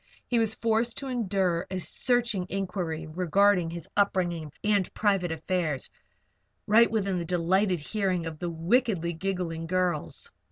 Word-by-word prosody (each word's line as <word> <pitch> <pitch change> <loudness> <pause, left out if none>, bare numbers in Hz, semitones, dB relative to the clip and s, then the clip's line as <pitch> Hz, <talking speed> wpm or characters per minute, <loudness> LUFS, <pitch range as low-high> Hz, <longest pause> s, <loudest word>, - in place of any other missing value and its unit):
He 240 - +1
was 220 -1 +2
forced 230 +1 0
to 275 - -5
endure 190 -8 0
a 185 0 -3
searching 235 -2 +1
inquiry 180 -4 -3
regarding 180 +2 +2
his 170 -1 -7
upbringing 175 -6 0
and 205 -3 +2
private 195 -5 +1
affairs, 160 -3 -2 0.7
right 230 +3 +6
within 195 -4 0
the - - -2
delighted 180 +2 +1
hearing 185 +1 -1
of 160 -2 -6
the 175 - -2
wickedly 170 +1 +1
giggling 170 -2 -3
girls. 180 -3 -1
185 Hz, 135 wpm, -28 LUFS, 170-205 Hz, 0.7 s, right